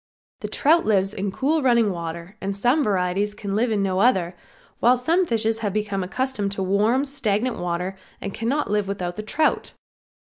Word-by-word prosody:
The - - -4
trout 325 +4 +3
lives 195 -2 +1
in 195 0 -3
cool 300 +9 +1
running 235 -5 +3
water 170 +2 -6
and 195 0 -3
some 250 +8 +2
varieties 200 0 0
can 200 -2 -4
live 235 +3 +2
in 205 -2 +1
no 190 -1 0
other, 190 -6 +2 0.4
while 245 +2 +5
some 335 +8 +1
fishes 225 -2 0
have 205 -4 -2
become 205 -2 -1
accustomed 210 +1 -2
to 195 - -2
warm, 210 +8 +2
stagnant 250 -4 -1
water 180 +2 -2 0.2
and 195 - -5
cannot 235 0 -1
live 210 -1 +1
with 200 0 -3
the 180 +2 -4
trout. 305 +8 0
210 Hz, 180 wpm, -23 LUFS, 195-245 Hz, 0.4 s, while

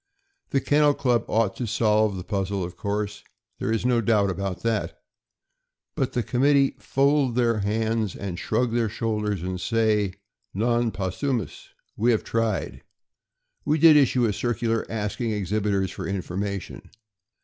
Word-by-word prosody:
The 135 - +2
Kennel 145 +1 +3
Club 125 -4 +1
ought 110 -3 +1
to 120 - -3
solve 110 -2 +2
the 90 - -5
puzzle, 100 -1 -2
of 90 0 -6
course 105 +2 -3 0.2
— 110 -4 -51
there - - -1
is 115 +1 -1
no 125 -2 +3
doubt 105 -3 +2
about 95 0 -4
that; 115 -3 -1 0.9
but 135 -4 -2
the 120 - 0
committee 135 +3 +3
fold 140 -2 +2
their 115 -3 +2
hands 110 0 -1
a 100 -1 -5
d - - -5
shrug 115 +6 -1
their 115 -2 +1
shoulders, 105 -4 -2
and 90 0 -4
say: 110 -4 +1 0.4
Non 120 +2 +1
possumm; 110 +7 -2 0.5
we 115 +3 +1
have 115 -3 +2
tried. 115 -3 -2 0.8
We 150 +2 +1
did 160 0 +7
issue 130 -4 +4
a 105 - +1
circular 115 0 -1
asking 110 +1 -2
exhibitors 100 -1 -1
for - - -6
information. 100 +1 -4
110 Hz, 150 wpm, -25 LUFS, 100-120 Hz, 0.9 s, did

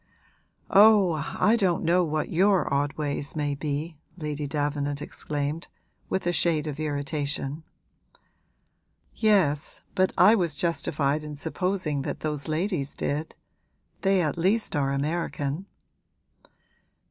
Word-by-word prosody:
'Oh, 195 -7 +6 0.2
I 220 - +5
don't 190 -7 +1
know 175 +2 +3
what 155 -2 -2
your 190 -1 +3
odd 140 +1 +1
ways 145 -1 -3
may 145 -2 0
be!' 150 +2 -4 0.2
Lady 150 -3 -3
Davenant 145 -1 -1
exclaimed, 150 +1 -4 0.4
with 190 - -1
a 175 - +1
shade 160 -3 +1
of 150 -1 -5
irritation. 145 0 -2 1.5
'Yes, 185 -10 +2
but 185 0 +2
I 200 +5 +7
was 175 -8 +1
justified 150 -2 0
in 150 -1 -6
supposing 160 -1 -1
that - - -4
those 150 -2 -3
ladies 155 -2 -1
did: 150 +3 -3 0.7
they 195 -2 +3
at 155 +2 -2
least 195 +3 +1
are 140 -2 +1
American.' 150 +3 -2
155 Hz, 120 wpm, -26 LUFS, 145-180 Hz, 1.5 s, I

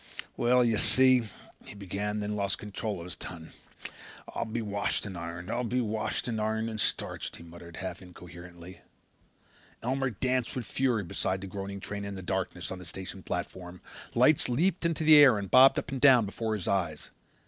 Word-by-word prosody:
"Well, 125 +1 +3
you 115 -2 +2
see," 130 -3 +4 0.3
he - - -11
began, 100 +1 -4
and 105 0 -2
then 105 +1 -2
lost 100 -1 -1
control 105 0 -4
of 85 - -8
his 90 - -6
tongue. 80 -2 -9 0.8
"I'll - - -2
be 115 +1 -3
washed 100 0 -1
and 100 -2 -6
ironed. 85 +3 -6
I'll 120 +1 -1
be 125 +2 0
washed 110 -1 -2
and 110 -3 -2
ironed 110 +1 -1
and 110 -1 -3
starched," - - -2
he - - -12
muttered 85 0 -12
half 95 +2 -6
incoherently. 90 0 -12 1.0
Elmer 135 +2 0
Cowley 110 - -12
danced 130 -2 0
with 125 -3 -3
fury 125 -6 0
beside 95 +2 -2
the - - -6
groaning 100 +1 -6
train 100 +1 -5
in 100 0 -5
the 95 - -7
darkness 95 -1 -3
on 95 - -5
the 90 - -10
station 95 +2 -8
platform. 90 0 -5 0.4
Lights 130 +3 +4
leaped 170 +7 +1
into 165 -1 -2
the 155 -1 +8
air 135 -7 +8
and 100 -2 -5
bobbed 130 +1 +7
up - - -3
and 135 -2 -4
down 130 -6 +7
before 110 +2 -3
his 100 - -5
eyes. 85 -6 -1
105 Hz, 195 wpm, -29 LUFS, 95-120 Hz, 1.0 s, the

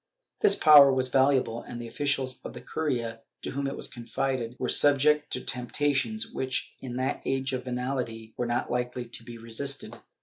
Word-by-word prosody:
This 420 - +5
power 145 -3 +8
was 130 -1 +1
valuable, 130 -3 +2
and 120 - -8
the 120 - -6
officials 135 -1 -1
of - - -7
the - - -9
curia, 120 -7 -3 0.2
to - - -4
whom 140 +1 -2
it 135 - -4
was - - -2
confided, 125 0 -3
were 125 - -2
subject 145 +3 +4
to 125 - -1
temptations 145 - -1
which, 130 - -2
in 125 -2 -7
that 130 +1 -1
age 135 0 -1
of 130 0 -3
venality, 125 -3 -4
were 120 - -2
not 120 0 -1
likely 125 0 -2
to 120 - -7
be 120 -1 -9
resisted. 115 0 -3
130 Hz, 180 wpm, -28 LUFS, 120-135 Hz, 0.2 s, power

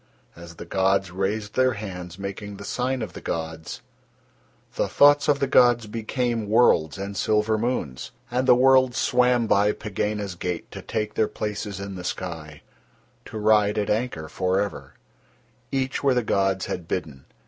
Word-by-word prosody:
as 85 -1 -11
the 85 - -9
gods 95 +1 +1
raised 105 +3 -2
Their 130 -1 +3
hands 90 -4 -7
making 100 +1 -6
the 100 - -9
sign 125 +1 -1
of - - -7
the - - -9
gods, 80 -1 -5 0.9
the - - 0
thoughts 145 0 +5
of 145 -1 +4
the 140 - +2
gods 120 -3 +4
became 115 0 -2
worlds 95 -9 +3
and 100 +1 -5
silver 105 +2 +1
moons. 110 - -2 0.2
And 125 +1 0
the - - +7
worlds 130 -1 +4
swam 125 -1 +3
by 105 0 +3
Pegāna's 105 -2 -3
gate 90 0 -5
to - - -8
take 105 -1 -3
their 110 - +1
places 105 -2 -4
in 100 0 -6
the 90 -1 -7
sky, 80 -5 -6 0.6
to 110 - -7
ride 105 -1 +3
at 105 - 0
anchor 105 -8 -2
for 95 +3 0
ever, 70 -10 -4 0.8
each 135 0 -1
where 135 -2 +3
the 125 - +1
gods 95 -2 +1
had 85 -2 -5
bidden. 75 -8 -4
105 Hz, 165 wpm, -24 LUFS, 95-120 Hz, 0.9 s, the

